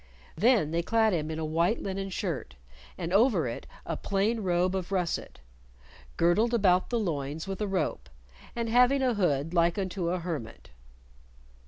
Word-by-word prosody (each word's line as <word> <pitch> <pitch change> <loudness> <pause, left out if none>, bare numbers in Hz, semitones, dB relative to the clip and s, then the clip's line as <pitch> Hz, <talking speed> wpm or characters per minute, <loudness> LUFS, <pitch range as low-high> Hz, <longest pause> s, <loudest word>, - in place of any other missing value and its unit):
Then 210 - +3
they 170 +1 +1
clad 220 +3 +2
him 155 -2 -1
in 160 - -4
a 160 - -2
white 170 +7 +1
linen 195 0 -4
shirt, 165 - -4 0.4
and 170 +2 -4
over 200 - +4
it 115 - -6 0.2
a - - -2
plain 205 +4 0
robe 180 -2 +1
of 185 0 -4
russet, 180 - -2 0.8
"girdled 210 +8 +3
about 185 -4 +3
the 240 - 0
loins 155 -5 -3
with 195 +1 -5
a 210 - 0
rope, 190 -1 -2 0.5
and 235 -1 -2
having 250 +4 +4
a 250 -2 +2
hood 165 -6 0
like 170 +1 +2
unto 185 -3 -2
a 180 - 0
hermit." 160 - -6
185 Hz, 165 wpm, -28 LUFS, 165-210 Hz, 0.8 s, over